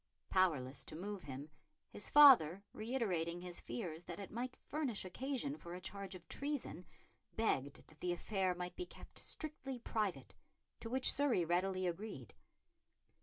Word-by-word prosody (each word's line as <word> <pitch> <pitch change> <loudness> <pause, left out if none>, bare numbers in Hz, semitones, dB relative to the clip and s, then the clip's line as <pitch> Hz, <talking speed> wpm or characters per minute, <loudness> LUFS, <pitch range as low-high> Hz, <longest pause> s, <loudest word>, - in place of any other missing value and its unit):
Powerless 150 -9 +2
to - - -7
move 200 +3 -4
him, 140 +2 -7 0.4
his 205 - -3
father, 215 - +8
reiterating 190 -8 -1
his 180 -1 -6
fears 160 +8 -5
that 175 0 -6
it 200 - -7
might 245 +3 -3
furnish 275 -10 -1
occasion 270 +8 -2
for 170 0 -7
a - - -6
charge 195 0 -5
of 175 -3 -12
treason, 280 - -3 0.5
begged 140 -11 0
that 155 - -20
the 180 - 0
affair 185 +1 0
might 180 0 -5
be 360 0 -4
kept - - -10
strictly 280 -4 -4
private, 215 -4 -2 0.5
to 230 - -6
which 260 +2 +6
Surrey 270 -11 +2
readily 185 +2 +1
agreed. 175 - -4
185 Hz, 150 wpm, -38 LUFS, 170-240 Hz, 0.5 s, father